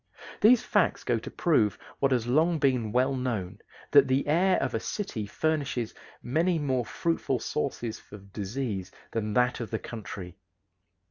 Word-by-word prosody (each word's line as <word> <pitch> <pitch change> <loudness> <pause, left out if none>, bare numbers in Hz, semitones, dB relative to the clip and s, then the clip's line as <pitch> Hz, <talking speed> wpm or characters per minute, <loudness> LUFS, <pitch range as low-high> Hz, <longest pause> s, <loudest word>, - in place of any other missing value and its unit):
These 235 +3 +6
facts - - +1
go - - +1
to - - -8
prove 110 - +2 0.2
what 135 -1 +2
has 120 -3 +2
long 160 +7 +3
been 125 -7 +1
well 130 +3 +2
known, 110 -8 -3 0.3
that 140 -2 +7
the 130 +1 +1
air 180 +5 +3
of - - -1
a - - 0
city 115 - -4
furnishes 140 -3 -1 0.3
many 165 +8 +1
more 130 -5 0
fruitful 165 -5 -1
sources 120 -3 -3
for 105 - -12
disease 100 0 -4 0.2
than 110 -2 -2
that 125 +2 +2
of 115 - -4
the 110 - -1
country. 95 -6 -8
125 Hz, 155 wpm, -28 LUFS, 110-150 Hz, 0.3 s, that